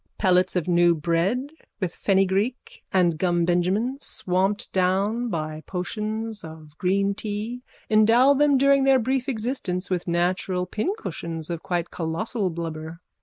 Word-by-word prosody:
Pellets 185 -2 +2
of 180 -1 0
new 175 -1 +4
bread 175 - 0 0.3
with 185 -4 -2
fennygreek 195 +5 0
and 175 -4 +2
gumbenjamin 180 - +1
swamped 190 0 -1
down 195 +6 +1
by 155 -4 -4
potions 215 +3 -4
of 155 -2 -11
green 195 +2 +1
tea 215 +4 -4 0.3
endow 230 +5 +5
them 285 0 +4
during 275 0 +4
their 270 0 +5
brief 260 +2 -1
existence 220 -7 -3
with 180 -1 -1
natural 180 +1 0
pincushions 180 - -4
of 170 -1 -4
quite 175 -2 -2
colossal 190 +5 -2
blubber. 165 -1 -6
190 Hz, 125 wpm, -24 LUFS, 175-225 Hz, 0.3 s, endow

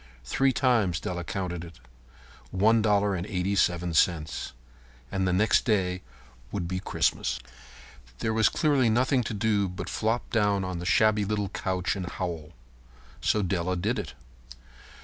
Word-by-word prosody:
Three 135 - +2
times 115 - +2
Della 90 0 -4
counted 90 -1 -4
it. 85 -1 -11 0.7
One 110 - +3
dollar 105 -1 +2
and 90 +1 -3
eighty 95 -1 -1
seven 85 -3 +1
cents. 80 -4 +1 0.6
And 95 -1 0
the - - +2
next 105 +5 +3
day 95 -5 +1 0.5
would 90 -4 -3
be 95 +1 -2
Christmas. - - 0 0.8
There 110 - -1
was 110 -3 +4
clearly 140 -6 +2
nothing 130 +3 +2
to 110 - -3
do 105 -2 +1
but 90 0 -6
flop 115 +2 -1
down 105 -4 +2
on 90 -2 -4
the 90 - -4
shabby 110 +2 +4
little 105 -1 -1
couch 95 -1 -1
and 95 -3 -4
howl. 85 -4 -5 0.7
So 105 - +2
Della 90 0 -1
did 105 +8 -1
it. - - -6
95 Hz, 150 wpm, -27 LUFS, 90-110 Hz, 0.8 s, was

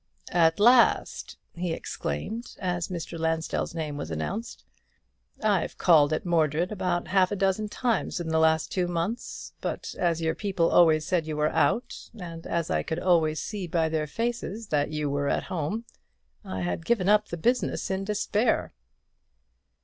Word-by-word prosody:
"At 165 0 +4
last!" 240 +3 +4 0.2
he 175 -1 -2
exclaimed, 220 - -5
as 175 -3 -1
Mr. 170 -2 -5
Lansdell's 160 0 -1
name 155 -3 -3
was 80 - -5
announced. 80 - -4 0.8
"I've 205 -5 +1
called 155 -4 +5
at 155 - -1
Mordred 165 +1 +1
about 180 -4 -1
half 190 0 +3
a - - 0
dozen 195 +2 0
times 235 +2 -1
within 170 -2 -3
the 160 - +3
last 160 0 +3
two 180 -2 0
months; 175 +7 -4
but - - -4
as 170 -2 +1
your 160 -1 0
people 190 -5 0
always 155 -3 +5
said 165 -2 0
you 155 -1 -3
were 150 0 +2
out, 245 - 0
and 165 -2 -7
as 170 -1 -1
I - - +2
could 160 - -3
always 165 -4 +2
see 205 -4 -4
by 160 -1 +1
their 155 -1 -1
faces 230 +3 -3
that 145 -1 +1
you 150 -1 -2
were 140 0 0
at - - 0
home, 185 +8 -2 0.6
I 95 - -5
have 90 - -2
given 195 -1 +1
up 210 +1 +4
the 170 - -5
business 240 +2 0
in 190 0 -1
despair." 210 +2 0
170 Hz, 165 wpm, -27 LUFS, 160-200 Hz, 0.8 s, called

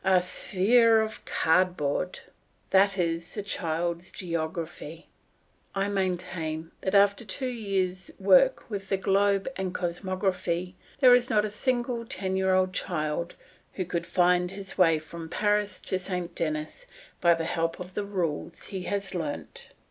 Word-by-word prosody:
"A 190 -1 +5
sphere 220 +5 +3
of 220 0 -3
cardboard." 180 -1 +1 0.5
That 195 +1 +4
is 170 -1 -2
the 205 - -3
child's 170 -2 -2
geography. 165 -1 -5 0.7
I 195 +1 0
maintain 175 -4 -2
that 190 +1 -1
after 200 +2 +4
two 225 +6 -4
years' 195 -5 -2
work - - +5
with 195 -3 -5
the 195 - +2
globe 195 +1 +2
and 190 -1 -3
cosmography, 180 0 -1 0.3
there 255 -2 +8
is 245 0 +4
not 210 -1 +3
a 210 - -4
single 240 +1 -1
ten 190 -4 -3
year 190 0 +2
old 185 0 +2
child 170 -1 -2 0.4
who 185 - -3
could 170 -1 -3
find 180 -1 +3
his 195 0 -8
way 165 -4 +5
from 160 +1 -8
Paris 205 0 0
to 185 - -2
Saint 180 -2 -4
Denis 155 - -3 0.3
by 170 -1 +5
the 165 0 -3
help 165 0 -1
of 180 0 -8
the 205 - -2
rules 175 -5 -3
he 190 -2 -4
has 200 -1 -2
learnt. 160 -5 -5
185 Hz, 150 wpm, -27 LUFS, 170-200 Hz, 0.7 s, there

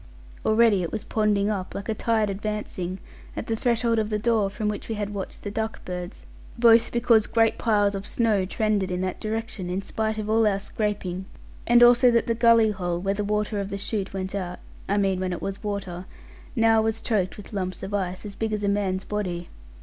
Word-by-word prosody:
Already 220 -3 +4
it 170 - -3
was 215 - -4
ponding 210 -3 +1
up, 195 -3 -3
like 200 - -5
a 220 - 0
tide 220 -1 +1
advancing 195 -3 -4 0.4
at - - -3
the 225 - -1
threshold 235 -1 +1
of 215 -1 -1
the 210 - 0
door 215 -2 +2
from 210 +2 -3
which 210 +1 -3
we 225 - -1
had 205 0 -3
watched 195 -2 -6
the 205 - -4
duck 220 +1 -4
birds; 180 +1 -6 0.3
both 230 -1 +5
because 235 -2 +3
great 225 -1 +2
piles 205 -3 +2
of 195 0 -4
snow 220 -5 +2
trended 205 0 0
in 180 0 -2
that 185 -1 -3
direction, 220 -4 -3
in 190 +2 -2
spite 220 +2 -2
of 215 -1 -3
all 220 0 +3
our 200 -2 +2
scraping, 200 -3 -3 0.4
and 240 0 +7
also 245 +1 +7
that 235 -1 +3
the 230 - +1
gulley 230 -1 +5
hole, 175 -3 -2
where 195 +2 0
the 205 +1 -2
water 210 0 -1
of 200 0 -3
the 200 - -3
shoot 200 0 -3
went 190 0 -4
out 180 -3 -3 0.3
(I 200 - +2
mean 195 -2 +1
when 185 -1 -1
it 175 - -4
was 195 0 -4
water) 190 -3 -4 0.5
now 225 -2 +4
was 220 0 0
choked 200 -5 -1
with 205 +1 -11
lumps 185 -2 -3
of 195 +2 -5
ice, 185 -1 -2
as 205 - -5
big 220 -1 -2
as 210 -1 -2
a - - +1
man's 195 -2 0
body. 180 -5 -3
210 Hz, 220 wpm, -25 LUFS, 190-220 Hz, 0.5 s, and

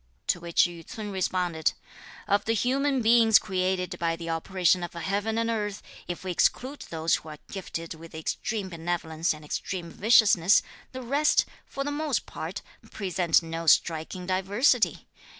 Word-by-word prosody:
To 180 - +1
which 170 0 +2
Yü 170 -2 -3
ts'un 210 +4 -7
responded: 180 -4 0 0.5
"Of 200 -1 +2
the 225 - +1
human 265 +2 +1
beings 225 -1 +6
created 185 -1 -1
by 165 -1 0
the 165 0 -5
operation 180 +2 +1
of 175 - -5
heaven 200 +6 -2
and 230 0 +1
earth, 210 -3 -2 0.2
if 175 0 -5
we 185 - -3
exclude 260 - 0
those 160 0 +1
who 160 - -11
are 150 - -8
gifted 165 -4 -5
with 165 0 -12
extreme 195 +5 -3
benevolence 165 -1 -2
and 155 -1 -6
extreme 170 +2 -4
viciousness, 205 -3 +5 0.3
the 255 0 -7
rest, 285 +5 +3 0.2
for 275 - -4
the 290 - -3
most 300 +1 -1
part, - - -6 0.3
present 180 -4 +1
no 165 0 -5
striking 165 +3 +2
diversity. 200 +7 +1
185 Hz, 155 wpm, -27 LUFS, 165-220 Hz, 0.5 s, beings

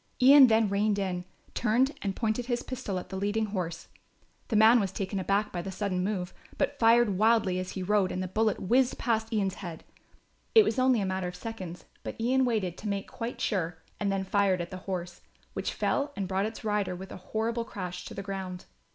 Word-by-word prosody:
Ian 270 +1 +9
then 220 -1 +4
reined 205 +1 +1
in, 180 -3 -2 0.3
turned 245 +4 +2
and 195 -2 -2
pointed 230 +1 -1
his 240 -1 -1
pistol 255 -7 -4
at 180 - -6
the 190 - -6
leading 205 +3 0
horse. 180 -5 -4 0.6
The 225 - -1
man 220 +3 +7
was 195 -4 -1
taken 195 0 -3
aback 200 +3 0
by 175 - -3
the 190 - -5
sudden 190 -2 -1
move, 185 -2 -2 0.2
but 285 0 -1
fired 230 -4 +4
wildly 215 -4 +3
as 185 0 -5
he 190 - -4
rode 195 -1 +2
and 185 - -2
the - - -3
bullet 215 +2 +1
whizzed 250 +6 +2
past 225 -1 0
Ian's 200 -4 0
head. 170 -4 -7 0.7
It 440 - +10
was 340 - 0
only 255 -3 +4
a - - 0
matter 190 -1 -2
of 180 - -6
seconds, 185 -7 -7 0.2
but - - -7
Ian 255 +3 +3
waited 200 -7 -1
to 210 - -6
make 200 -1 -2
quite 230 +1 -5
sure 175 -5 -1 0.2
and 200 -1 0
then 195 -1 0
fired 190 -1 +2
at 175 +1 -5
the 185 - -5
horse, 175 -2 -4 0.3
which - - -2
fell 285 +1 -1
and 195 -2 -2
brought 195 +2 0
its 225 - -8
rider 210 -3 0
with 190 +2 -9
a - - -7
horrible 225 +5 -2
crash 180 -5 -6
to - - -8
the 195 - -5
ground. 190 -2 -5
200 Hz, 215 wpm, -29 LUFS, 185-225 Hz, 0.7 s, It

